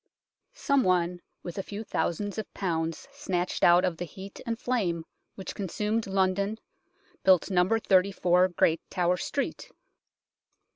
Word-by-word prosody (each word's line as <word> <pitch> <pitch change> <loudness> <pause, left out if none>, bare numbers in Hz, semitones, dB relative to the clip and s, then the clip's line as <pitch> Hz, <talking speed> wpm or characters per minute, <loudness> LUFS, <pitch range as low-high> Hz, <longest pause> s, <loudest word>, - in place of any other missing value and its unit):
Some 280 - +2
one 180 -1 +1 0.2
with 175 +2 -6
a - - +1
few 205 +3 -7
thousands 205 0 -2
of 215 - -6
pounds 165 -3 -2
snatched 190 -11 -2
out 175 +2 +6
of 175 -3 -1
the 175 - -4
heat 190 +4 -10
and 230 -1 -1
flame 185 -11 -1 0.3
which 190 - -6
con 195 - -4
sumed 215 +4 -1
London 195 +2 +1 0.6
built 190 0 +4
No. 180 0 +3
34 185 -3 +3
Great 165 -2 +1
Tower 180 0 +1
Street. 280 - -3
185 Hz, 140 wpm, -28 LUFS, 175-205 Hz, 0.6 s, out